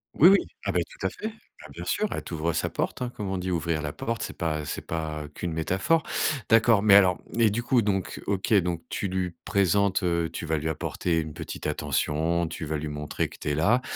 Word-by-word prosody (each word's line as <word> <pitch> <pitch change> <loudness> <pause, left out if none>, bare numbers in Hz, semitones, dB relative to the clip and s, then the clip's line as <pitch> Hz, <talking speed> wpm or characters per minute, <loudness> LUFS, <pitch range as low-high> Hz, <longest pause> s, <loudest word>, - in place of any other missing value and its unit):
Oui, 160 - +8
oui. 200 - +7 0.3
Ah - - +1
bah, - - +3
tout - - -9
à - - -1
fait. 215 - -6
Bah, 220 - -16
bien - - -7
sûr: 215 - +1
«Elle - - -2
t'ouvre 85 0 -2
sa 80 - 0
porte», - - -3
hein, 125 - -2
comme 100 -3 -4
on 95 - -1
dit. 90 +1 -3
Ouvrir 85 -2 0
la 75 0 -4
porte, 115 0 -3
c'est - - -5
pas 80 -3 -1
c'est - - -4
pas 80 -2 -3
qu'une 85 0 -4
métaphore. 95 - +1 0.5
D'accord, 115 -2 +5
mais 100 -2 +7
alors, 95 -3 +6 0.2
et 115 -2 +6
du 115 +4 -2
coup, 120 0 +3
donc, 95 -2 -1
OK, 100 +2 0
donc 85 -3 +1
tu 100 - -2
lui 90 -1 -1
présentes, 100 0 +2
heu 85 -1 +1
tu 85 - -5
vas 80 0 0
lui 80 +2 -3
apporter 80 +1 -1
une 80 -1 -7
petite - - -7
attention, 80 +4 0
tu 80 - -5
vas 80 +1 -2
lui 75 +1 -4
montrer 75 0 -2
que - - -13
tu - - -3
es 75 - +1
là. 110 - +3
90 Hz, 235 wpm, -27 LUFS, 80-105 Hz, 0.5 s, Oui